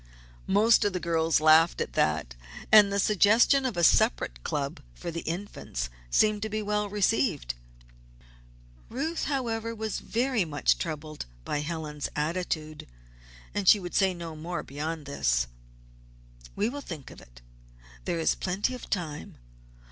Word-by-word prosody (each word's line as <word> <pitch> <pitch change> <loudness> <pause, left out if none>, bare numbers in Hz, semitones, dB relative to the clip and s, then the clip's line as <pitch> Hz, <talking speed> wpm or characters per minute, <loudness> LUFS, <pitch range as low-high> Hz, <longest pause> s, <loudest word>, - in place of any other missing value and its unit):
Most 215 +4 +5
of 205 -2 +1
the 180 - -1
girls 165 -2 +1
laughed 155 +2 +5
at - - -3
that. 75 -6 0 0.4
And 210 -2 +8
the 200 - 0
suggestion 220 +7 +4
of 235 - -5
a 170 - +1
separate - - +3
club 140 -1 -3 0.2
for 170 - -6
the 165 - -4
Infants 170 - -5 0.2
seemed 215 - +3
to 220 - -2
be 215 0 -2
well 210 0 -1
received. 205 - +1 1.4
Ruth, 315 +7 -2
however, 230 -5 -2
was 220 -1 -3
very 245 -2 0
much 150 -3 +1
troubled 155 - -5 0.2
by 145 - -1
Helen's 150 -1 -4
attitude, 155 -1 -3 0.7
and 205 -2 -2
she 210 - +8
would 175 -2 -7
say 190 -1 +3
no 170 -2 -7
more 170 +3 -4
beyond 150 +2 -5
this: 60 - +1 1.1
"We 210 - +1
will 285 +4 -5
think 160 - -8
of - - -13
it. - - -18 0.6
There - - -1
is 165 - +2
plenty 195 +7 -2
of 250 - -9
time. 160 -6 -4
175 Hz, 150 wpm, -28 LUFS, 155-215 Hz, 1.4 s, And